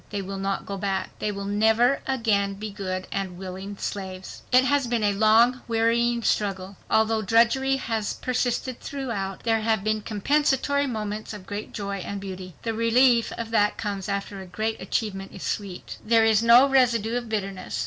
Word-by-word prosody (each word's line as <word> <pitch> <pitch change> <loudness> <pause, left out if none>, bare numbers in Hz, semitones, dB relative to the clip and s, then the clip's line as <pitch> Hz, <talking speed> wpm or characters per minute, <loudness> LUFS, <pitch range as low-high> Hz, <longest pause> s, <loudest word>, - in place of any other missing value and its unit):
They 200 -1 -3
will 195 +1 -5
not 195 0 -2
go 200 - -5
back. 195 -1 -2
They 210 - -1
will 200 -1 -5
never 220 +6 +3
again 215 -6 +1
be 210 +1 -6
good 185 -2 -4
and 190 -3 -3
willing 190 +2 -7
slaves. 190 -2 -6
It 255 0 +6
has 280 -1 +1
been 235 -2 0
a 205 -1 +2
long, 225 +4 +4
wearying 235 +1 +1
struggle. 195 -2 -1
Although 220 0 +2
drudgery 235 +6 +3
has 225 -5 -2
persisted 250 0 -2
throughout, 230 -9 -4
there 225 -1 +1
have 220 -2 +1
been 215 0 0
compensatory 280 +6 +1
moments 215 -3 -4
of 195 -3 -11
great 205 +2 -6
joy 200 -2 -4
and 200 +1 -5
beauty. 185 -2 -8
The 225 - -1
relief 230 +1 +3
that 225 -3 +1
comes 200 -2 -4
after 200 0 -3
a 190 - -10
great 220 +5 -3
achievement 195 -3 -3
is 190 - -9
sweet. 195 -4 -5
There 225 0 +4
is 220 -1 +4
no 235 +4 +7
residue 240 -4 +2
of 240 -2 -3
bitterness. 195 -3 -3
215 Hz, 175 wpm, -25 LUFS, 195-235 Hz, -, no